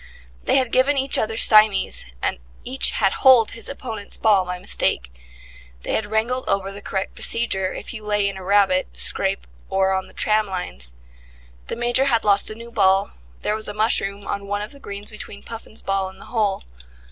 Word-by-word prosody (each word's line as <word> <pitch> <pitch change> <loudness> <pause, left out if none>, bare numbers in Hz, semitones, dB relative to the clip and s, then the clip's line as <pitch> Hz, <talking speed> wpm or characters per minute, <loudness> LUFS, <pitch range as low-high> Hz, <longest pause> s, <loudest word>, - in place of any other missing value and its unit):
They - - +3
had 260 -3 +2
given 275 +3 +3
each 270 0 +1
other 220 0 -2
stymies, 215 - +4 0.2
and - - 0 0.2
each 265 +2 +1
had 195 -2 +2
holed 255 -4 +5
his 230 - -6
opponent's 225 -7 -5
ball 205 -4 +3
by 180 0 -4
mistake; 60 - -1 0.7
they - - -3
had 220 - 0
wrangled 230 +4 -1
over 195 0 0
the 200 +1 -8
correct 190 -1 -3
procedure 190 -5 +1
if - - -6
you 215 -2 -8
lay 210 -1 +1
in 200 - -3
a 190 - -8
rabbit 195 -1 +3
scrape - - 0 0.2
or 190 0 +2
on 190 0 -2
the - - -18
tram 215 0 +2
lines: 65 - -6 0.7
the - - -3
Major 240 +3 +1
had 235 -5 +1
lost 200 -1 +3
a 215 - -6
new 235 +1 -11
ball; 195 -2 +3 0.3
there 210 - +1
was 220 - -5
a 205 - -6
mushroom 205 -2 +1
on 200 0 -4
one 205 +1 -2
of 210 - -7
the 280 - -13
greens 200 -3 -6
between 210 -1 -8
Puffin's 225 -1 -9
ball 195 -1 -1
and 190 0 -16
the - - -12
hole. 210 -4 0
210 Hz, 195 wpm, -22 LUFS, 195-230 Hz, 0.7 s, holed